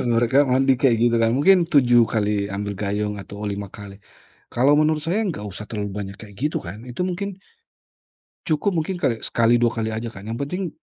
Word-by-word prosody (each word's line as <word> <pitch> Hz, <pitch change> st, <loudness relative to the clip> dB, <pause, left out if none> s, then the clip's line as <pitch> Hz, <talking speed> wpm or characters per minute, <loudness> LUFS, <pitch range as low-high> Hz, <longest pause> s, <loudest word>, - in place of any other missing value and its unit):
Mereka 130 Hz, +5 st, +3 dB
mandi 130 Hz, 0 st, +3 dB
kayak 120 Hz, -2 st, +4 dB
gitu 120 Hz, -1 st, +3 dB
kan, 115 Hz, 0 st, +3 dB
mungkin 175 Hz, +5 st, +4 dB
7 120 Hz, -7 st, +4 dB
kali 105 Hz, -2 st, 0 dB
ambil 100 Hz, 0 st, -4 dB
gayung 105 Hz, 0 st, -2 dB
atau 100 Hz, +1 st, -9 dB
5 100 Hz, -1 st, -4 dB
kali. 100 Hz, 0 st, -11 dB, 0.5 s
Kalau 135 Hz, +4 st, +3 dB
menurut 155 Hz, 0 st, +1 dB
saya 175 Hz, +7 st, 0 dB
nggak 155 Hz, -, -4 dB
usah 105 Hz, +1 st, -7 dB
terlalu 105 Hz, -2 st, -4 dB
banyak 100 Hz, -1 st, -6 dB
kayak 105 Hz, -3 st, -12 dB
gitu 150 Hz, +4 st, 0 dB
kan, 105 Hz, +8 st, -9 dB
itu 125 Hz, +9 st, -3 dB
mungkin 190 Hz, +2 st, -3 dB, 1.1 s
cukup, 160 Hz, +5 st, +1 dB
mungkin 165 Hz, +3 st, -1 dB
kali 115 Hz, -8 st, -1 dB
sekali 115 Hz, 0 st, +3 dB
dua 120 Hz, -1 st, +2 dB
kali 110 Hz, -, -1 dB
aja 115 Hz, +1 st, -4 dB
kan, 95 Hz, +1 st, -11 dB
yang 115 Hz, -, -3 dB
penting, 180 Hz, +5 st, -3 dB
115 Hz, 195 wpm, -22 LUFS, 105-145 Hz, 1.1 s, kayak